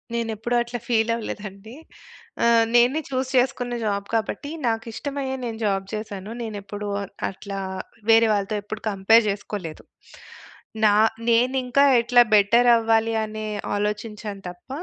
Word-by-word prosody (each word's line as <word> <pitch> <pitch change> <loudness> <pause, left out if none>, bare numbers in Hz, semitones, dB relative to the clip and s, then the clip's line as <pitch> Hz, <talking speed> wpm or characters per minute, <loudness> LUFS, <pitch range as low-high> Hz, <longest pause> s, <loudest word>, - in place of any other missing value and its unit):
నేనేప్పుడూ 230 +1 -2
అట్ల 240 0 -4
ఫీల్ 225 -1 +2
అవ్వలేదండి. 210 0 -7 0.7
ఆహ్, 230 -1 +5
నేనే 250 +6 +4
చూస్ 260 0 -2
చేసుకున్న 245 -1 0
జాబ్ 200 -1 -2
కాబట్టి, 225 +6 -2 0.2
నాకిష్టమయ్యే 265 +4 -3
నేను 225 -1 -4
జాబ్ 195 -1 0
చేసాను. 210 -1 -6
నేనేప్పుడూ 205 -2 -6 0.4
అట్లా, 195 0 -7 0.5
వేరే 225 0 +6
వాళ్ళతో 205 +1 -1
ఎప్పుడు 215 +1 -7
కంపేర్ 215 +4 +4
జేసుకోలేదు. 200 -5 -5 1.0
నా 205 - +5 0.4
నేనింకా 250 +3 +3 0.2
ఎట్లా 245 +1 +5
బెటర్ 230 +4 +5
అవ్వాలి 225 0 +2
అనే 215 0 -6 0.3
ఆలోచించాను 210 -1 -4
తప్ప 175 +8 -21
225 Hz, 115 wpm, -23 LUFS, 205-240 Hz, 1.0 s, వేరే